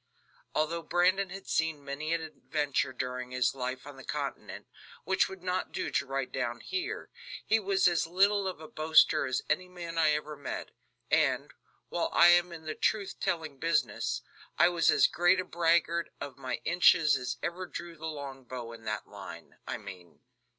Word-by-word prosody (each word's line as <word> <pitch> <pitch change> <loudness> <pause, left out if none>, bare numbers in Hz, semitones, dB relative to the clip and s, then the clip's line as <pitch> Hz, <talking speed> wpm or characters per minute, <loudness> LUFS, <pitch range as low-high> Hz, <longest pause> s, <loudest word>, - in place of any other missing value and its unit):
Although 165 +2 0
Brandon 180 +3 +2
had 195 +1 -8
seen 160 -3 0
many 145 +3 -4
an 165 0 +1
adventure 145 -3 -1
during 125 0 -4
his 125 0 +1
life 130 -1 -4
on 145 -2 -10
the 135 - -10
continent, - - -5 0.4
which 190 0 +2
would 190 -2 -10
not 185 0 -1
do - - -3
to - - +1
write 135 -1 -2
down 120 0 -2
here, 375 -1 -4 0.3
he 225 - +3
was 195 -2 +3
as 170 -2 +2
little 195 +3 +3
of 185 - -4
a 160 - -9
boaster 155 -3 +4
as 130 0 -1
any 180 +4 0
man 170 -2 -5
I 155 -2 +5
ever 150 0 -3
met, 145 -1 -6 0.4
and, - - +2 0.4
while - - -1
I 170 - +8
am 175 0 +5
in 165 -1 -9
the 155 - -3
truth 205 +2 -1
telling 160 -5 -2
business, 150 -10 0 0.3
I 170 - +6
was 175 -1 +2
as - - +6
great 175 +2 +3
a 185 - -1
braggart 170 0 +2
of 140 -3 -6
my 130 -2 -4
inches 165 -3 +5
as 125 -2 -3
ever 180 +2 -3
drew 175 -1 -7
the 160 0 -6
long 140 -4 -6
bow 120 -2 -7
in 115 -1 -12
that - - -3
line, - - -10
I - - -2
mean. 90 -4 -11
160 Hz, 185 wpm, -30 LUFS, 135-175 Hz, 0.4 s, I